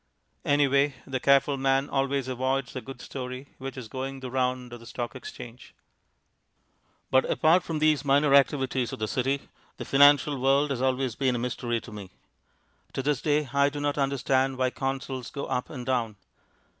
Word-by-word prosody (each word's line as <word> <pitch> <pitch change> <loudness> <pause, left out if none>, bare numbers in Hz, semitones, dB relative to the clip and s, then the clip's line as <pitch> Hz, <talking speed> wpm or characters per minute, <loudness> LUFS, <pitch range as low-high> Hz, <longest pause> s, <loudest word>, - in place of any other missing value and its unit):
Anyway, 140 -1 +3
the 135 -1 -3
careful 140 +1 +3
man 135 +1 +1
always 135 -1 -1
avoids 130 +1 -2
a 130 - -3
good 135 -1 -10
story 130 +1 -7
which 135 0 -6
is 125 -3 -7
going 135 +3 -5
the 130 -1 -7
round 125 -1 -1
of 120 - -8
the 115 - -14
Stock 120 0 -5
Exchange. 125 -1 -10 1.4
But 130 0 +5
apart 165 +4 +4
from 165 -2 -4
these 155 -1 +2
minor 140 0 +3
activities 135 -3 +2
of - - -5
the 110 - -2
City, 135 +4 -1 0.3
the - - -6
financial 145 0 +5
world 140 +2 +3
has 130 -2 -2
always 130 -1 0
been 130 0 0
a - - 0
mystery 120 -1 -2
to 115 - -12
me. 100 -3 -8 0.8
To 135 - -3
this 145 -1 0
day 150 -1 +1
I 140 0 +4
do 145 +1 -6
not 145 0 -1
understand 135 -1 +1
why 130 -1 +1
Consols 135 -2 -4
go 140 - -5
up 125 -1 -2
and 125 -5 -7
down. 120 -4 -1
135 Hz, 180 wpm, -27 LUFS, 125-140 Hz, 1.4 s, But